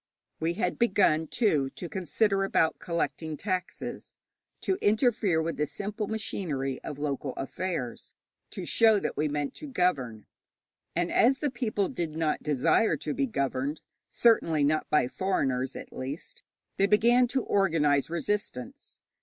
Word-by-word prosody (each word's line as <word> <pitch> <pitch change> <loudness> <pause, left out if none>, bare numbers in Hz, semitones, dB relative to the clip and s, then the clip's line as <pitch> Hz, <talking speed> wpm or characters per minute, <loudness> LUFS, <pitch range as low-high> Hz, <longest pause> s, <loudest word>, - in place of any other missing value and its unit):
We 165 +1 0
had 180 -1 -2
begun, 190 -8 +3
too, 155 - +1
to 175 - -6
consider 195 +4 0
about 165 -4 +1
collecting 165 -3 -2
taxes, 185 0 -4 0.4
to 380 0 0
interfere 215 -5 +2
with 165 +1 -3
the 150 - 0
simple 210 +4 -4
machinery 150 -11 -3
of 145 - -6
local 140 -2 -3
affairs, 135 -4 -4 0.3
to - - -6
show 220 -2 +4
that - - -3
we 150 - +1
meant 145 -1 -2
to 300 - -7
govern. 140 - 0 0.7
And 175 +1 0
as 260 +3 +4
the 290 -1 -1
people 215 -5 -1
did 165 -3 -4
not 160 -2 0
desire 150 - +2
to 150 - -3
be 275 - 0
governed 140 - -2 0.3
certainly 165 -10 +3
not 155 +2 +1
by 150 -5 +3
foreigners, 135 -7 -1
at - - -9
least 135 +5 -6 0.4
they 195 - +4
began 235 +4 +5
to 260 0 -1
organize 155 -8 +2
resistance. 170 - -4
170 Hz, 145 wpm, -28 LUFS, 145-210 Hz, 0.7 s, began